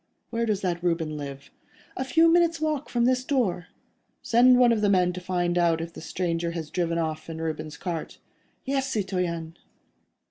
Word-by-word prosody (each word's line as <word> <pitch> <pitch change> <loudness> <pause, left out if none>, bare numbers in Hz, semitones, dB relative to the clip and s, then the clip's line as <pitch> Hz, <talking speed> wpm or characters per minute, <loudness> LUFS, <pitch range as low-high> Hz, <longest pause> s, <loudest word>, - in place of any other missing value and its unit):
Where 230 0 -1
does 205 -2 0
that 175 -2 -1
Reuben 165 -3 0
live?" 140 -1 -8 0.4
"A 260 - -2
few 320 +6 +4
minutes' 335 0 +3
walk 305 -2 -1
from 240 -1 +1
this 255 0 +2
door." 210 - 0 0.6
"Send 245 +2 +5
one 245 -1 +5
of 225 -2 +1
the 205 - +3
men 180 -2 +3
to 180 - -6
find 175 -1 0
out 170 -2 +3
if 165 0 -6
the - - -9
stranger 170 0 -2
has 160 -3 -5
driven 170 -2 -1
off 160 -1 -3
in 160 0 -6
Reuben's 155 -2 -4
cart." 170 -4 -5 0.5
"Yes, 270 0 -1
citoyen." 180 -6 -2
180 Hz, 180 wpm, -26 LUFS, 165-245 Hz, 0.6 s, Send